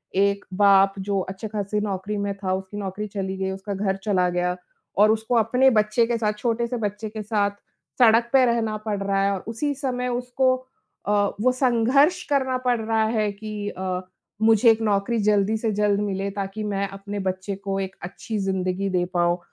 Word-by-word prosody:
एक 200 +1 +2 0.2
बाप 195 -1 +6
जो 200 0 -1
अच्छे-खासे 205 +2 -3
नौकरी 205 0 -3
में 200 0 -1
था 190 -2 -2
उसकी 190 +2 -7
नौकरी 205 +1 -4
चली 190 -2 -4
गई 190 0 -2
उसका 195 +1 -5
घर 195 0 -1
चला 185 -4 +2
गया 180 0 0 0.4
और 210 +1 +6
उसको 220 +2 0
अपने 250 +4 +4
बच्चे 215 0 +2
के 235 0 0
साथ, 215 -2 0
छोटे 235 +2 -1
से 245 +1 -3
बच्चे 210 0 -3
के 215 0 -6
साथ 205 -1 +1 0.5
सड़क 235 0 +5
पे 265 -1 +6
रहना 230 -3 0
पड़ 210 -2 -1
रहा 195 0 +1
है 200 - +2
और 190 - -5
उसी 260 +6 -2
समय 255 -2 -2
उसको 250 +1 +1 0.5
अ, - - +1 0.3
वो 255 +3 +4
संघर्ष 260 +7 +3
करना 265 -3 +1
पड़ 245 -2 +2
रहा 220 0 +1
है 215 -2 0
कि 210 0 -5
अ, 185 -2 -3 0.4
मुझे 225 +1 +5
एक 225 0 0
नौकरी 210 +2 +1
जल्दी 205 0 +2
से 220 0 -1
जल्द 205 0 +2
मिले, 200 -1 -2
ताकि 200 +2 -4
मैं 200 -1 -1
अपने 200 +1 -6
बच्चे 190 +1 -2
को 195 0 -3
एक 190 0 -4
अच्छी 210 +4 -5
ज़िंदगी 190 0 -1
दे 180 -1 +1
पाऊँ। 175 0 +2
210 Hz, 190 wpm, -24 LUFS, 195-225 Hz, 0.5 s, बाप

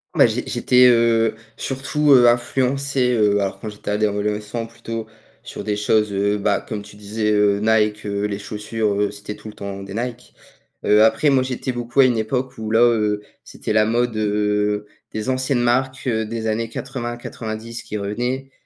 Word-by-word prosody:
Bah - - +6
j'ai - - -2
j'étais, 125 0 +4
heu, 115 -2 +4 0.2
surtout, 145 +3 0
heu, 120 -2 +7
influencé, 130 +2 +1
heu, 105 -2 +3
alors 100 -1 -2
quand 110 - -6
j'étais 105 0 -8
ado 105 +1 +2
adolescent, 105 +2 -3
plutôt 115 -1 -6 0.3
sur - - -8
des 105 -1 -1
choses, 105 0 +1
heu, 100 +1 +1
bah 100 - +1
comme 105 -2 -4
tu 105 0 -14
disais, 105 +1 -2
heu, 105 -1 +3
Nike, 105 -1 +2
heu, 100 0 -1
les 100 -1 -3
chaussures, 105 +1 -2
heu, 105 - +2
c'était 105 +1 -8
tout - - -12
le 105 - -9
temps 100 -1 -6
des 100 0 -8
Nike. 120 +1 -5 0.5
Heu, 105 +1 +6
après 110 +7 +4
moi 135 -1 +4
j'étais 130 0 -3
beaucoup 120 +1 -3
à - - +7
une 120 -3 +2
époque 125 +4 -2
où 110 -1 -4
là, 110 +1 +3
heu, 105 -3 +2 0.2
c'était - - -5
la 110 0 +4
mode, 120 +1 0
heu, 105 0 0 0.3
des 110 +3 -3
anciennes 130 0 0
marques, 130 +2 +1
heu, 110 -3 0
des 115 0 -4
années 110 +1 -1
80-90 120 -2 -6
qui 105 - -5
revenaient. 125 +6 -3
110 Hz, 185 wpm, -21 LUFS, 105-120 Hz, 0.5 s, heu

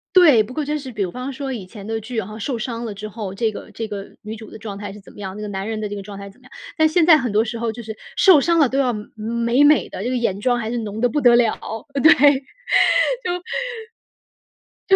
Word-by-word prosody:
对， 310 -11 +7
不 235 - -10
过 300 +2 -2
真 300 +1 -1
是 265 -3 -8
比 210 -4 -1
方 250 +9 -5
说 270 0 -4
以 215 -7 -6
前 200 +1 -11
的 225 +1 -2
剧， 230 +2 -4
好 190 - -8
像 215 +1 -8
受 240 +4 -2
伤 230 +1 -4
了 220 -3 -4
之 210 +2 -7
后， 210 -2 -6
这 220 +2 0
个 - - -9
这 225 -1 -5
个 200 -1 -7
女 215 +1 -6
主 220 -1 -11
的 - - -10
状 210 -2 -7
态 205 -1 -6
是 210 - -11
怎 195 - -16
么 - - -14
样， 190 -1 -6
那 210 - -7
个 210 - -4
男 195 0 -4
人 220 -1 -3
的 215 - -2
这 205 - -5
个 200 - -5
状 200 0 -9
态 200 0 -8
怎 195 - -20
么 - - -22
样， - - -18 0.3
但 315 -1 +5
现 325 +1 +3
在 330 -3 +8
很 245 -6 -2
多 215 +2 +2
时 230 0 -5
候 230 -1 -1
就 235 +2 -9
是 220 -1 -7 0.2
受 360 -7 +7
伤 335 +3 +2
了 300 -4 +5
都 265 +3 -1
要 255 -3 +2
美 210 - -5
美 235 +4 +1
美 300 0 +4
的， 190 - -6
这 240 - -1
个 255 - 0
眼 200 -5 -1
妆 245 +2 +2
还 225 -1 -3
是 240 - -2
浓 215 -1 -5
得 245 - +3
不 295 +5 -1
得 245 -2 +6
了， 235 -2 +3 0.5
对， 315 - +9 2.8
就 385 - +6
225 Hz, 300 characters per minute, -21 LUFS, 210-255 Hz, 2.8 s, 对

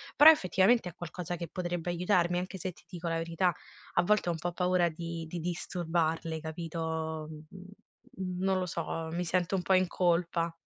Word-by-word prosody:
Però 305 +3 +11
effettivamente 195 - +3
è 175 - -14
qualcosa 175 +1 -5
che 170 -1 -5
potrebbe 175 -1 -2
aiutarmi, 175 0 +2
anche 185 +1 -5
se 185 +1 -3
ti - - -20
dico 175 -2 -5
la 165 - 0
verità, 165 +2 +1 0.4
a - - +4
volte 205 -1 +2
ho - - +3
un 165 - -3
po' 175 +1 -2
paura 180 -1 +2
di 165 0 -5
di 175 - -4
disturbarle, 165 -1 -1
capito, 160 -1 -4
mhmm, 155 0 -9
uhm, 190 +1 -12 0.7
non 190 0 +2
lo 185 - -1
so, 165 -1 -3
mi 175 +2 -2
sento 180 +2 +1
un 185 - 0
po' 190 - +2
in 185 -1 +4
colpa. 170 -1 +1
175 Hz, 190 wpm, -31 LUFS, 165-180 Hz, 0.7 s, Però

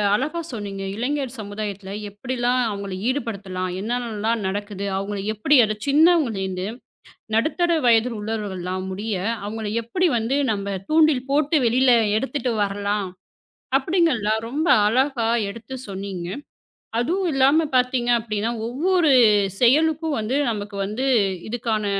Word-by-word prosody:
அழகா 300 +9 -2
சொன்னீங்க. 200 -4 -5
இளைஞர் 265 +2 -2
சமுதாயத்துல 205 -2 -6 0.2
எப்படிலாம் 245 +3 -1
அவங்கள 200 -2 -5
ஈடுபடுத்தலாம், 200 -8 -3
என்ன 215 +4 -4
என்னலாம் 225 -1 -2
நடக்குது, 200 0 -4
அவங்களுக்கு 200 +1 -3
எப்படி 275 +8 +3
ஒரு 215 0 -2
சின்னவங்கள 300 - +4
இருந்து 185 0 -3 0.7
நடுத்தர 340 +8 +1
வயது 230 +1 +4
உள்ளவர்கள் 210 -4 -4
எல்லாம் 185 +1 -3
முடிய 205 +3 -3 0.3
அவங்களை 210 0 -4
எப்படி 360 +10 +1
வந்து 235 +5 0
நம்ம 200 -1 -2
தூண்டில் 310 -5 +3
போட்டு 295 +2 +2
வெளில 250 +2 +4 0.3
எடுத்துட்டு 260 0 -2
வரலாம் 200 -1 -2 0.7
அப்படிங்கற 325 +1 +2
எல்லாம் 215 +1 0
ரொம்ப 310 +6 -1 0.2
அழகா 255 0 +1 0.2
எடுத்துச் 240 +5 -8
சொன்னீங்க. 190 -2 -5 0.7
அதுவும் 355 +9 0
இல்லாம 275 +4 +4
பார்த்தீங்க, 250 -1 +1
அப்படின்னா 215 0 -2 0.2
ஒவ்வொரு 325 +5 +2 0.5
செயலுக்கும் 310 +4 +3
வந்து 235 +6 -1
நமக்கு 205 -2 -5
வந்து 240 +6 -3 0.4
இதுக்கான 225 -2 -1
230 Hz, 125 wpm, -22 LUFS, 205-270 Hz, 0.7 s, சின்னவங்கள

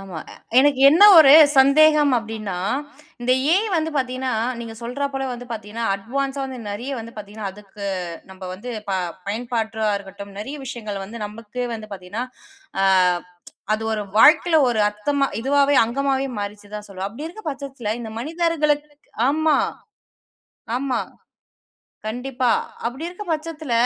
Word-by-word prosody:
ஆமா. 190 -4 -8 0.4
எனக்கு 275 0 +4
என்ன 335 +7 +5
ஒரு 285 -3 +9 0.3
சந்தேகம் 295 +1 +6
அப்டினா, 220 -3 -5 0.7
இந்த 250 +1 +2 0.2
ஏஐ 420 +4 +2
வந்து 320 -1 0
பார்த்தீங்கனா 255 0 -1 0.3
நீங்க 225 -1 -7
சொல்றா 250 +4 -2
போல 270 0 -2
வந்து 245 0 -8
பார்த்தீங்கனா, 220 +1 -5
அட்வான்ஸா 270 +7 -3
வந்து 260 -1 -6
நெறைய 240 +7 -5
வந்து 230 +1 -9
பார்த்தீங்கனா, 205 -1 -6
அதுக்கு 200 0 -11 0.5
நம்ப 190 0 -10
வந்து 235 +7 -8 0.2
ப - - 0 0.3
பயன்பாட்டா 220 0 -2
இருக்கட்டும் 200 0 -11
நெறைய 270 +8 -5
விஷயங்கள் 215 -6 -5
வந்து 230 +4 -9
நமக்கே 230 +3 -6
வந்து 215 -1 -8
பார்த்தீங்கனா, 195 +5 -5 0.6
அ 195 - +3 0.9
அது 215 +1 0
ஒரு 215 - -1
வாழ்க்கையில 320 +7 +6
ஒரு 235 - 0
அர்த்தமா 275 +7 0
இதுவாகவே 280 +2 +3
அங்கமாகவே 270 +3 0
மாறிருச்சு 205 0 -6
தான் 210 0 -6
சொல்லுவோம். 195 0 -5
அப்படி 235 +9 -8
இருக்கிற 435 +6 -10
பட்சத்தில 270 -6 -5
இந்த 225 -2 -6
மனிதர்களுக்கு 300 -1 0 0.4
ஆமா 310 0 +3 1.2
ஆமா. 265 -1 -1 1.1
கண்டிப்பா 250 +2 -1 0.4
அப்படி 265 +8 -4
இருக்கிற 360 +4 -8
பட்சத்தில 310 -3 -4
245 Hz, 135 wpm, -22 LUFS, 210-280 Hz, 1.2 s, ஒரு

